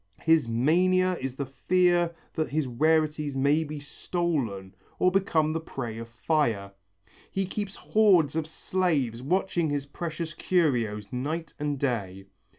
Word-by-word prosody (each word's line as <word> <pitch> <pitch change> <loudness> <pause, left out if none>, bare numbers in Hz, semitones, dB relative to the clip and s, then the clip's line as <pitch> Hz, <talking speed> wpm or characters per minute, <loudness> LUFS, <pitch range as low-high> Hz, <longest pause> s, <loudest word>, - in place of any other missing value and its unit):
His 160 -5 +4
mania 180 +10 +3
is 130 -1 -4
the 140 - -3
fear 175 +4 +2 0.2
that 155 -1 -1
his 155 0 0
rarities 150 +2 +1
may 140 +4 +3
be 150 -1 -6
stolen 140 - -3 0.2
or 185 - +3
become 160 -5 +2
the 165 - -1
prey 120 -8 -6
of 115 0 -8
fire. 115 -6 0 0.6
He 195 0 -1
keeps 200 +1 -4
hoards 185 -9 +3
of 160 -1 -1
slaves 155 -10 -1
watching 175 +2 0
his 145 -1 -2
precious 160 +2 -5
curios, 120 - 0
night 150 +5 -3
and 145 -1 -1
day. 100 -8 -2
155 Hz, 140 wpm, -27 LUFS, 130-170 Hz, 0.6 s, His